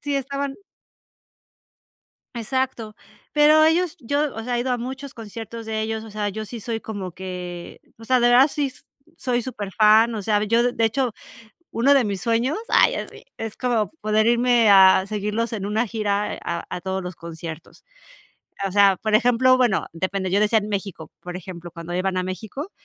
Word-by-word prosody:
Sí, 290 -1 -2
estaban 275 +1 -3 1.8
Exacto. 235 -2 -3 0.4
Pero 305 +1 +6
ellos 335 +1 +2
yo, 285 +4 -1
o 225 - -5
sea, 245 +1 -2
he - - 0
ido 255 +1 -2
a 245 - -1
muchos 265 +3 -6
conciertos 225 +1 -8
de 220 0 -2
ellos, 220 0 -3
o 220 - -11
sea, 210 0 -2
yo 215 +2 -5
sí 230 +1 -8
soy 225 0 -4
como 195 -5 -6
que 180 -2 -7 0.2
o 225 - -12
sea, 255 +1 +3
de 240 0 +4
Oasis 275 +1 +3
sí - - -31 0.3
soy 245 -2 -1
superfán, 220 0 +3
o 210 - -4
sea, 210 0 +1
yo, 230 +3 +3
de 245 0 +1
de 225 - 0
hecho, 245 +1 0 0.6
uno 265 +5 +3
de 270 -3 +4
mis 195 -3 -3
sueños, 235 - 0
ay, - - +4
así, - - -7
es 225 -1 -6
como 235 -4 0
poder 215 +1 +2
irme 240 -2 +4
a 190 -1 +7
seguirlos 210 +3 -2
en 200 -3 -3
una 215 +3 0
gira 210 -1 -1
a 170 0 -3
a 180 - -5
todos 190 0 -3
los 180 -1 -6
conciertos. 165 -1 -9 0.8
O - - -6
sea, 200 -1 +5
por 215 -1 +2
ejemplo 245 +3 +4
bueno, 245 -6 +1
depende, 185 +3 -2
yo 200 +3 +2
decía 215 +1 +3
en 210 +1 -6
México, 195 -6 -5
por 180 0 -7
ejemplo, 175 -2 -8
cuando 170 +1 -8
iban 185 0 -1
a 185 - 0
México, 220 - -6
220 Hz, 185 wpm, -23 LUFS, 195-245 Hz, 1.8 s, a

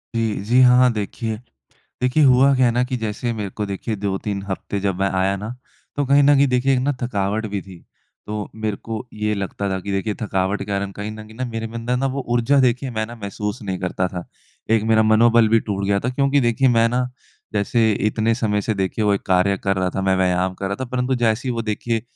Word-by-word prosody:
जी, 115 -2 +1
जी 120 +4 +3
हाँ, 125 0 +6
देखिए, 110 +1 -3 0.7
देखिए 130 +5 +3
हुआ 135 +1 +5
क्या 130 -1 +4
है 120 - +2
ना 125 +1 +1
कि 125 0 -3
जैसे 115 +1 -3
मेरे 105 -3 -4
को 105 +3 -4
देखिए 100 +3 -4
2-3 100 0 -3
हफ़्ते 100 +1 -4
जब 95 -1 0
मैं 95 - +2
आया 95 +1 +2
ना 105 +2 -6 0.5
तो 145 - +1
कहीं 140 +2 +5
न 145 +1 +6
कहीं 140 +1 +5
देखिए 125 +2 +2
एक 130 - +3
ना 140 +3 +1
थकावट 105 -1 -1
भी 100 -1 -3
थी। 95 -3 -12 0.5
तो 105 -1 -4
मेरे 110 -2 -2
को 115 0 -6
ये 105 0 -1
लगता 100 0 -3
था 95 - -1
कि 100 +2 -5
देखिए 100 +2 -1
थकावट 95 -1 -1
क्या 100 0 -3
है 100 - -2
ना 100 - -9
कहीं 105 +1 -4
न 110 0 -9
कहीं 110 - -14
न 130 - -1
मेरे 115 0 -4
में 115 - -11
अंदर 115 +2 -1
ना 135 - 0
वो 140 - -3
ऊर्जा 120 +4 +3
देखिए 125 +1 +1
मैं 110 -2 -2
ना 120 - -9
महसूस 105 +2 -5
नहीं 95 -3 -3
करता 90 0 -1
था। 90 -2 -6 0.5
एक 110 -1 +3
मेरा 110 0 +5
मनोबल 115 +1 +5
भी 115 +1 +4
टूट 100 -1 -1
गया 100 0 +1
था 125 - -2
क्योंकि 140 +2 +2
देखिए 120 +2 +2
मैं 115 0 +4
ना 125 +1 0 0.4
जैसे 110 +2 +2 0.2
इतने 110 +1 +1
समय 105 -3 0
से 110 - -1
देखिए 95 +2 -1
वो 105 -1 +3
एक - - -3
कार्य 95 +1 +3
कर 95 - +2
रहा 95 -1 0
था 95 - -1
मैं 95 0 +2
व्यायाम 90 0 +1
कर 95 - -4
रहा 100 +1 -2
था 130 - -1
परंतु 125 +1 0
जैसे 120 +1 0
ही 125 - 0
वो 115 - -2
देखिए 115 +1 -2
110 Hz, 245 wpm, -21 LUFS, 100-125 Hz, 0.7 s, हाँ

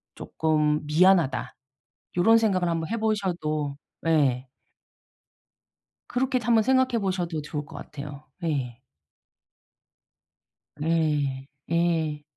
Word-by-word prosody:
쪼끔 150 -1 0
미안하다.' 170 0 +3 0.6
요런 225 +6 +6
생각을 190 -5 +1
한번 165 -1 -2
해보셔도 180 -10 -1 0.3
예. 135 -5 +2 1.6
그렇게도 255 -1 0
한번 230 -2 +4
생각해 260 0 +2
보셔도 180 -5 -2
좋을 150 0 -5
것 - - -10
같아요. 145 -1 -9 0.2
예. 130 -7 -2 2.0
예. 150 -5 0 0.2
예. 165 -3 +1
160 Hz, 190 characters per minute, -26 LUFS, 150-190 Hz, 2.0 s, 요런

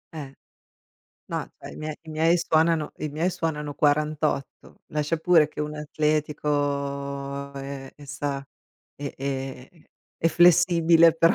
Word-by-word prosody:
Eh, 140 -3 -6 1.0
no, - - -3
cioè, - - -9
i - - -11
mie 155 0 -5
i 160 - -17
miei 165 +3 +3
suonano 160 -1 +2
i 155 - -3
miei 160 +5 0
suonano 150 -4 -3
48. 150 -1 0
Lascia 150 +2 0
pure 160 -2 +4
che 150 - -7
uno 150 0 -3
è - - -5
atletico 140 -2 -1
e 135 -1 -7
e, 145 -1 -13
sa 140 -1 -3 0.5
e 140 0 -5
e 135 +3 -6 0.3
è 165 - +2
flessibile, 170 -1 +6
però, 165 0 +5
150 Hz, 140 wpm, -25 LUFS, 140-160 Hz, 1.0 s, flessibile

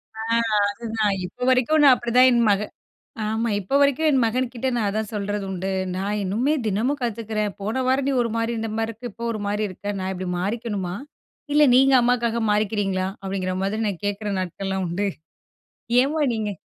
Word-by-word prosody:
ஆ. 220 - -5 0.5
அதுதான். 220 -2 -1
இப்ப 250 +7 -5
வரைக்கும் 260 +5 +3
நான் 265 -3 +8
அப்படிதான் 250 +2 +4
என் 235 -1 +3
மக 200 +1 +2 0.7
ஆமா. 225 +2 -1
இப்ப 235 +9 -1
வரைக்கும் 285 +3 +3
என் 265 -3 +3
மகன்கிட்ட 250 +2 -1
நான் 215 -3 0
அதான் 215 +1 -3
சொல்றது 205 0 -2
உண்டு. 190 +1 -3 0.2
நான் 205 +2 -2
இன்னுமே 235 +11 +1
தினமும் 235 +8 0
கத்துக்குறேன். 220 -3 -2
போன 220 +6 -1
வாரம் 265 +1 +2
நீ - - +1
ஒரு 230 - -2
மாரி 230 +1 0
இருந்த 225 -1 -3
மாரி 225 0 -1
இருக்கு, 230 +2 -8
இப்போ 230 +4 -8
ஒரு 215 - -5
மாரி 210 +1 -1
இருக்க. 205 +2 -5
நான் 190 0 -3
இப்படி 185 0 -5
மாறிக்கணுமா. 200 -2 -3 0.6
இல்ல 300 0 +6
நீங்க 270 +1 +5
அம்மாவுக்காக 235 -1 +1
மாறிக்கிறீங்களா 205 -3 0 0.2
அப்டிங்கிற 190 -1 -2
மாதிரி 215 +3 -1
நான் 195 -1 -5
கேட்கிற 205 +1 -3
நாட்கள்லாம் 190 +1 -3
உண்டு. 200 +4 -1 0.9
ஏம்மா 300 +3 0
நீங்க 215 -2 -2
220 Hz, 175 wpm, -23 LUFS, 200-245 Hz, 0.9 s, நான்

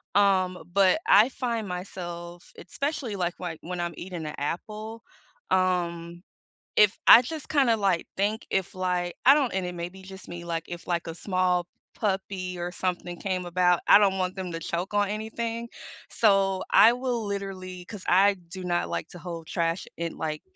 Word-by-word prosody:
um, 190 -3 +3
but 195 - +4
I 215 +5 +7
find 235 -5 -3
myself, 175 -1 -7
especially, 275 - -3
like, 180 -2 -1
why 175 -3 -5
when 180 +1 -5
I'm 175 0 -2
eating 175 -3 -6
a 150 - -5
apple. 215 +9 -5 0.5
Um, 175 -2 0 0.6
if 210 0 +5
I 235 - +10
just 310 +3 -7
kind 280 -4 +3
of, 225 - +3
like, 190 -4 +1
think 210 +3 -1
if, 190 -1 -1
like, 180 -1 -1
I 275 - +10
don't 280 -5 +1
and 190 -1 -1
it 180 - -5
may 170 0 -4
be 190 +1 -14
just 190 0 -11
me, 175 0 -7
like, 165 -1 -3
if, 175 0 -8
like, 175 -1 -1
a 165 - -5
small 180 -1 0 0.3
puppy 190 -3 -2
or 175 +1 -4
something 175 -1 -3
came 185 -2 -2
about, 180 0 +2
I - - +9
don't 195 -2 +3
want 185 0 -1
them 185 -2 -4
to 165 - -3
choke 175 +5 -3
on 205 -1 +2
anything, 230 +2 -4 0.4
so 195 -3 +2
I 230 +2 +7
will 245 -2 -2
literally 190 -2 -5
'Cause 200 +1 -9
I 195 +3 +5
do 185 +2 -8
not 175 -1 0
like - - -3
to 175 - -10
hold 170 -2 -7
trash 165 +1 -1
in, 170 0 -3
like 155 -1 -3
185 Hz, 185 wpm, -27 LUFS, 175-205 Hz, 0.6 s, I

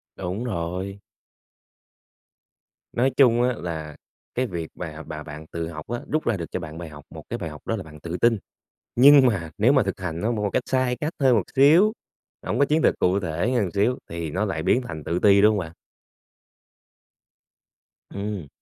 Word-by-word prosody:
Đúng 95 +5 -4
rồi. 95 -1 -4 1.9
Nói 130 +3 +2
chung 120 -3 +5
á 125 0 +2
là 80 -3 -5 0.4
cái 125 0 0
việc 85 -4 -5
và 80 -2 -7
mà 75 0 -6
bạn 75 0 -9
tự 85 -1 -3
học 75 -2 -8
á, 120 +1 -3
rút 155 0 0
ra 110 -4 +2
được 85 - -6
cho 90 - -2
bạn 80 -1 -8
bài 85 -2 -7
học, 75 -1 -12
một - - -10
cái - - -2
bài 80 - -4
học 75 - -10
đó 115 - 0
là 95 - -5
bạn 75 -1 -13
tự 85 +3 -5
tin. 115 -2 +3 0.6
Nhưng 135 +1 +8
mà 85 -9 0
nếu 120 +6 +5
mà 135 -4 +4
thực 95 -1 -4
hành 85 -2 -4
nó 115 +3 0
một 105 -2 -2
cái 100 - 0
cách - - 0
sai 130 -1 +1
cách 150 +6 -3
thôi 130 -3 +4
một 105 - +3
xíu, 165 +10 +6 0.5
hổng - - -1
có 140 - +5
chiến 155 +3 +1
lược - - +3
cụ 95 +2 +2
thể 85 +7 -1
hơn 115 -5 +2
một 90 - -3
xíu 110 +6 +2
thì 85 -2 -4
nó 95 +7 -1
lại 85 -6 -2
biến 125 +8 +2
thành 80 -11 -7
tự 85 +2 -1
ti, 100 0 +5
đúng 105 +1 +6
hông 105 - 0
bạn? 80 -3 -5 2.4
Ừm. 100 -6 -4
100 Hz, 210 wpm, -24 LUFS, 85-120 Hz, 2.4 s, Nhưng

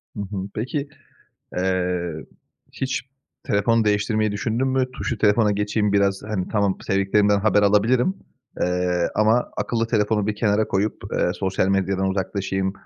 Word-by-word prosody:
Hı 105 - -4
hı, 100 -1 -5
peki, 140 +6 -3 0.7
eee, 90 -2 -1 0.6
hiç 130 0 -2 0.4
telefonu 115 +3 +2
değiştirmeyi 105 +1 +1
düşündün 110 +5 -1
mü? 130 -1 +1
"Tuşlu 120 -2 -3
telefona 105 +1 +3
geçeyim 105 0 0
biraz, 100 -1 +2
hani, 105 -4 -3
tamam 100 -3 0
sevdiklerimden 100 +1 +2
haber 105 0 +3
alabilirim, 115 - +3 0.5
eee, 90 -1 +1
ama 110 +3 +2
akıllı 115 -1 -1
telefonu 105 -2 +1
bir 105 - -1
kenara 105 0 +1
koyup, 100 +2 0 0.2
eee, - - +1
sosyal 95 -1 0
medyadan 95 0 +1
uzaklaşayım, 95 0 -2
105 Hz, 135 wpm, -23 LUFS, 95-110 Hz, 0.7 s, telefona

